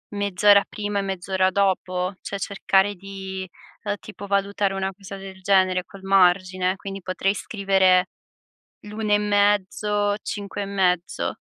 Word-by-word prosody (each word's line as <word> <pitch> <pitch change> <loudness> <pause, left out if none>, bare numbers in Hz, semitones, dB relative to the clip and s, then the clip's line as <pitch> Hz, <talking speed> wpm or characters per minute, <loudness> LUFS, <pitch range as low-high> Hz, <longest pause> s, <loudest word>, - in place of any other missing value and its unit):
mezz'ora 200 0 +4
prima 205 -1 -3
e - - +1
mezz'ora 190 -1 0
dopo? 185 -1 0
Cioè 200 - -5
cercare 195 0 +1
di, 190 0 -7 0.3
ehm, 205 -1 -1
tipo, 205 -1 -10
valutare 200 0 0
una 190 0 -2
cosa 195 0 -10
del 190 -1 -10
genere, 185 -1 +2
col 195 -1 -14
margine. 185 -1 +3
Quindi, 195 0 -7
potrei 185 +2 -1
scrivere 190 -3 +2 0.7
l'1 210 0 -2
e - - +6
mezzo, 205 0 +1
5 205 0 -5
e - - -4
mezzo. 185 -3 0
195 Hz, 135 wpm, -23 LUFS, 185-205 Hz, 0.7 s, e